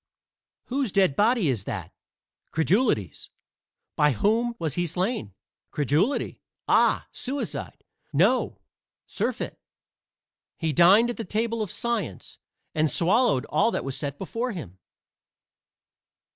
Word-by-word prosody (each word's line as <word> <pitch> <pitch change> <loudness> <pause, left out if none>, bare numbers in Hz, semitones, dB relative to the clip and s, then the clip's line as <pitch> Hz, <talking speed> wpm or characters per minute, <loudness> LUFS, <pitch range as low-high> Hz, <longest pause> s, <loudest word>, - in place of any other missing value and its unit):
"Whose 260 -3 -2
dead 190 -8 +3
body 220 - +3
is 115 -8 -1
that?" 95 -4 -5 0.6
"Credulity's." 160 - +1 0.7
"By 150 -1 +3
whom 230 - +1
was 160 - -2
he 175 +2 0
slain?" 180 - -2 0.3
"Credulity." 150 - 0 0.3
"Ah, - - +3
suicide." 275 +3 -4 0.3
"No, - - +2 0.5
surfeit. - - -3 1.0
He 160 -2 -1
dined 195 - +6
at - - -8
the 225 - -3
table 225 +3 -1
of 210 - -2
Science, 220 - -3 0.3
and 155 0 +2
swallowed 170 - +2
all - - +3
that - - -2
was 135 -1 -3
set 140 -1 -4
before 230 +5 -3
him." 95 - -8
185 Hz, 115 wpm, -26 LUFS, 145-230 Hz, 1.0 s, dined